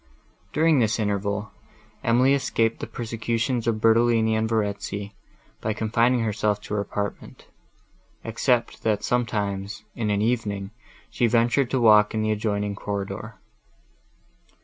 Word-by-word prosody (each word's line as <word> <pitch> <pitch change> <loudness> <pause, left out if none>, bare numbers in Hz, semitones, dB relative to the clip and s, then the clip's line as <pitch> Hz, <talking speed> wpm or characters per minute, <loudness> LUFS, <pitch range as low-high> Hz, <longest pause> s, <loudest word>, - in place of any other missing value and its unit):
During 155 +1 +3
this 110 -2 +2
interval, 100 0 -2 0.5
Emily 125 +4 +4
escaped 115 -4 0
the - - -5
persecutions 115 +1 -2
of 110 -2 +1
Bertolini, 115 0 +3
and 110 0 0
Verezzi, 100 -2 -2 0.5
by 110 - -1
confining 115 +3 +2
herself 105 -1 0
to - - -7
her 105 - +1
apartment; 100 0 -5 0.8
except 120 +1 0
that 105 -2 0
sometimes, 105 -3 -2
in 110 -3 -2
an 105 0 +1
evening, 105 -4 -1 0.4
she 120 - +2
ventured 120 +3 +2
to 130 - 0
walk 105 -2 +5
in 110 - 0
the 110 - +1
adjoining 105 -1 -1
corridor. 100 +2 -5
110 Hz, 125 wpm, -24 LUFS, 105-115 Hz, 0.8 s, walk